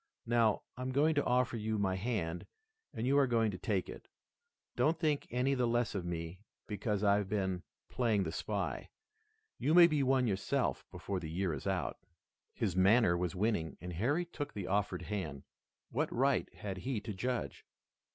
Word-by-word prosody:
Now, 115 -2 +2
I'm 130 +1 -3
going 150 +4 +3
to 145 - +1
offer 125 -1 +2
you 110 0 -1
my 95 -2 +1
hand 95 -5 -2 0.4
and 110 - -3
you 140 +2 +4
are 140 - +4
going 115 -3 +2
to 90 - -7
take 100 -6 -1
it. - - -10 0.7
Don't 160 +2 +2
think 155 -4 0
any 125 +3 +1
the 125 -2 +1
less 120 -1 +1
of 95 -4 -3
me 85 +1 -4 0.3
because 105 0 -2
I've 100 -1 +3
been 95 -3 -1 0.3
playing 110 -5 +1
the - - -3
spy. - - -3 0.7
You 155 - +2
may 175 -1 +10
be 155 -4 +2
one 130 -1 +3
yourself 100 -4 -1
before 100 -2 -4
the 80 -3 -6
year 90 +1 -1
is 70 - -5
out." - - -1 0.6
His 95 -6 -1
manner 95 0 +5
was 90 +1 -2
winning, 100 -5 0
and 90 +1 -6
Harry 140 - +1
took 150 -4 -6
the 100 -3 -4
offered 100 +2 0
hand. 80 -10 -4 0.5
What - - 0
right - - +1
had 95 -2 -6
he 125 +2 -2
to 105 0 -5
judge? 125 +5 -3
105 Hz, 180 wpm, -34 LUFS, 95-125 Hz, 0.7 s, may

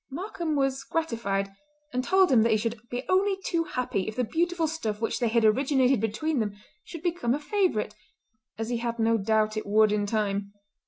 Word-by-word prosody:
Markam 335 0 -3
was 270 -1 0
gratified, 210 -11 -2 0.4
and 255 0 0
told 375 +2 +4
him 240 -4 +6
that 230 - +3
he 220 - +4
should 230 +1 -4
be 245 +1 -3
only 385 +1 +2
too 330 -1 0
happy 245 -9 -2
if 215 - -4
the 250 - 0
beautiful 335 +6 0
stuff 225 -10 -3
which 225 - -1
they 240 - +1
had 230 0 +2
originated 260 +2 +3
between 250 +7 -1
them 205 -2 -2 0.3
should 335 -2 -9
become 335 -9 0
a - - -4
favourite, 320 - 0 0.6
as 225 +1 -3
he 240 - 0
had 235 0 -3
no 225 0 +3
doubt 215 +1 +1
it 215 - -4
would 215 +1 +4
in 205 -1 0
time. 200 -2 -1
235 Hz, 200 wpm, -27 LUFS, 215-315 Hz, 0.6 s, him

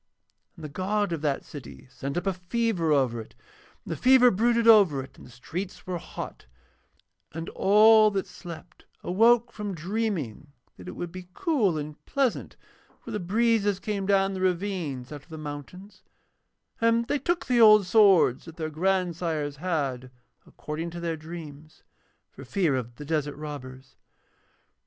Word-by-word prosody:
And 165 -4 -10
the - - -6
god 195 +4 -1
of 160 - -4
that 145 -3 -1
city 140 -2 -11
sent 140 +3 -5
up 175 - -2
a 195 - +1
fever 185 -2 -1
over 130 -5 +1
it, 110 - -15 0.5
and - - -7
the - - -1
fever 250 -1 +6
brooded 235 +3 +2
over 195 -12 +6
it 135 +1 -15
and - - -14
the - - -16
streets 180 +10 -7
were 180 -2 -3
hot; - - -8 0.9
and 165 +1 -5
all 215 +2 +6
that 195 -2 -2
slept 175 0 -11 0.2
awoke 235 +5 +3
from 210 -4 -5
dreaming 170 - -3 0.2
that - - -13
it - - -6
would 175 -1 -6
be 185 0 -9
cool 260 - +1
and 150 0 -7
pleasant 270 -4 -1 0.5
where 230 - -8
the 210 - -2
breezes 205 +1 +1
came 200 -2 -3
down 195 -1 +2
the 190 - -5
ravine 180 -7 -1
out 125 - -15
of 140 - -26
the 160 - -8
mountains; 155 +7 -9 0.8
and 230 0 +2
they 290 - 0
took 345 +6 -1
the 245 -2 +3
old 215 -2 +8
swords 185 - +4
that 165 0 -12
their 155 -1 -4
grandsires 170 -4 -1
had, 140 -7 -2 0.4
according 160 +3 -6
to 170 +1 -8
their 170 -1 -2
dreams, 155 -2 -10 0.5
for 135 - -12
fear 150 +2 0
of 120 -2 -4
the 145 - -9
desert 150 -2 -1
robbers. 130 -3 -9
180 Hz, 165 wpm, -26 LUFS, 150-210 Hz, 0.9 s, old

